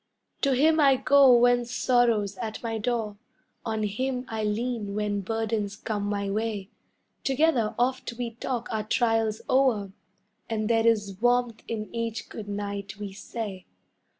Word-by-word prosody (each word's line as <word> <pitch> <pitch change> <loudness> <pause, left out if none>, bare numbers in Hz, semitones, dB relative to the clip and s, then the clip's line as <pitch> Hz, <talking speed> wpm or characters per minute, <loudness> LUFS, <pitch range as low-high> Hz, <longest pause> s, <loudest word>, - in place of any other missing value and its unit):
To 275 -2 +3
him 315 +4 +4
I 275 -3 +6
go 275 0 +6
when 245 0 +4
sorrow's 235 -4 +1
at 225 -2 -5
my 225 -1 -2
door, 220 -2 -2 0.5
On 220 -1 -2
him 250 +5 -2
I 220 -1 -3
lean 210 -1 -2
when 205 -1 -1
burdens 215 0 -2
come 210 -1 -3
my 200 -1 -1
way, 210 0 -2 0.5
Together 270 -5 +2
oft 255 +1 0
we 235 0 -4
talk 240 +1 -4
our 220 -1 0
trials 225 -1 +1
o'er 245 -7 +2 0.6
And 215 -1 -1
there 225 0 +3
is 205 -3 +1
warmth 245 -2 +2
in 215 -2 -5
each 230 -1 -3
good 210 -2 -8
night 200 -1 -4
we 205 -2 -6
say. 205 -2 -6
225 Hz, 150 wpm, -27 LUFS, 210-245 Hz, 0.6 s, I